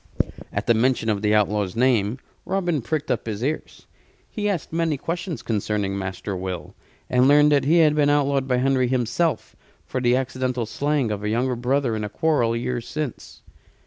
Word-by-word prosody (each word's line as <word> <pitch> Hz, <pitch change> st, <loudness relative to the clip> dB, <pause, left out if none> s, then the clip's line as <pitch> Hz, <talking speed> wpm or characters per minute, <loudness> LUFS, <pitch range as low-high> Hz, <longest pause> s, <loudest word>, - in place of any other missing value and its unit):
At -, -, -3 dB
the 115 Hz, -, +4 dB
mention 115 Hz, 0 st, +1 dB
of 105 Hz, -2 st, 0 dB
the 105 Hz, 0 st, +2 dB
outlaw's 105 Hz, -2 st, +1 dB
name 115 Hz, -2 st, +2 dB, 0.3 s
Robin 175 Hz, -6 st, -1 dB
pricked 150 Hz, +6 st, -2 dB
up -, -, -2 dB
his 110 Hz, +1 st, -3 dB
ears. 150 Hz, +4 st, -4 dB, 0.4 s
He 210 Hz, -1 st, -2 dB
asked 175 Hz, -6 st, -3 dB
many 165 Hz, -3 st, 0 dB
questions 170 Hz, -, -4 dB
concerning 105 Hz, -2 st, -1 dB
Master 95 Hz, +1 st, -4 dB
Will; 90 Hz, -1 st, -5 dB, 0.3 s
and 125 Hz, +1 st, +3 dB
learned 150 Hz, +1 st, +6 dB
that 140 Hz, -2 st, +3 dB
he 160 Hz, +4 st, +4 dB
had 155 Hz, -3 st, +5 dB
been 150 Hz, -1 st, +3 dB
outlawed 140 Hz, -2 st, +2 dB
by 125 Hz, -2 st, +2 dB
Henry 130 Hz, 0 st, +2 dB
himself 130 Hz, +6 st, -1 dB, 0.3 s
for 130 Hz, -, -3 dB
the 120 Hz, 0 st, +3 dB
accidental 130 Hz, -1 st, -1 dB
slaying 140 Hz, 0 st, 0 dB
of 105 Hz, -1 st, -4 dB
a 105 Hz, -, -1 dB
younger 125 Hz, +3 st, 0 dB
brother 125 Hz, 0 st, 0 dB
in 110 Hz, -, -3 dB
a 105 Hz, -, -3 dB
quarrel 120 Hz, -3 st, +1 dB
years 120 Hz, 0 st, -3 dB
since. 150 Hz, -3 st, -6 dB
125 Hz, 180 wpm, -23 LUFS, 110-145 Hz, 0.4 s, learned